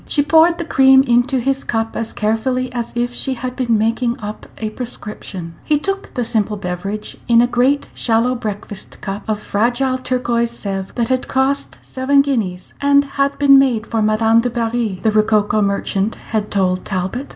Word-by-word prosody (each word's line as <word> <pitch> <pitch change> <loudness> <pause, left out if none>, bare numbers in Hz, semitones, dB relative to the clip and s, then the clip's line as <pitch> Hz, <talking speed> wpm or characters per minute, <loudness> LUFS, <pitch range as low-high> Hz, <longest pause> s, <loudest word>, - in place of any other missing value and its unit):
She 290 - +2
poured 325 +3 +4
the 340 - -4
cream 265 -3 +5
into 245 +1 +2
his 270 +2 -1
cup 225 -1 -2
as 230 - -3
carefully 250 +4 -1
as 235 -1 -3
if 240 0 -1
she 265 +1 -2
had 250 +1 -5
been 235 -3 +1
making 230 +2 0
up 210 0 -7
a 215 -1 -4
prescription. 210 -7 -7
He 300 - +2
took 390 +6 -3
the 245 - -1
simple 215 -2 0
beverage 195 +3 -5
in 235 -1 +5
a 240 - +5
great 250 +4 +1
shallow 230 +2 +1
breakfast 210 -4 -6
cup 195 0 -4
of 215 -1 0
fragile 245 +5 0
turquoise 240 -2 0
Sevres, 195 -4 -5
that 235 -1 -1
had 255 -1 0
cost 270 +1 0
seven 275 +2 +2
guineas, 215 -10 -2
and 280 0 +4
had 275 0 -1
been 275 -1 +6
made 245 -5 +1
for 225 -1 -1
Madame 220 +2 +3
du 245 - -1
Barry, 230 -4 -2
the 220 - +3
rococo 215 0 +2
merchant 200 +1 0 0.2
had 215 -2 -1
told 185 -2 0
Talbot. 190 +8 -3
235 Hz, 180 wpm, -18 LUFS, 215-260 Hz, 0.2 s, been